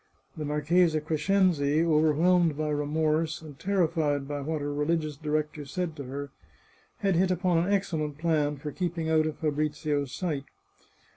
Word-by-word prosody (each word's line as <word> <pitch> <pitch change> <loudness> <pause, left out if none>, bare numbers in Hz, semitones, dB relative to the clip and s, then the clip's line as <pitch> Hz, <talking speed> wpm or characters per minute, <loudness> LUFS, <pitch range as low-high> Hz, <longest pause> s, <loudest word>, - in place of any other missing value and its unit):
The 155 - -4
Marchesa 155 +3 +2
Crescenzi, 155 -1 +2
overwhelmed 160 +1 +3
by 155 0 -1
remorse, 155 +2 0
and 150 -3 -12
terrified 160 -7 0
by 145 0 -3
what 155 +2 -2
her 145 0 -3
religious 155 +1 0
director 150 0 -2
said 165 +3 -3
to 140 - -6
her, 140 +2 -6 0.7
had 195 -3 +2
hit 185 +2 +3
upon 180 -1 +2
an 175 +4 0
excellent 160 -7 -1
plan 150 -3 +1
for 150 +2 -6
keeping 170 -2 -2
out 155 0 +3
of 155 - -4
Fabrizio's 150 -2 -1
sight. 145 -2 -3
155 Hz, 150 wpm, -28 LUFS, 145-170 Hz, 0.7 s, overwhelmed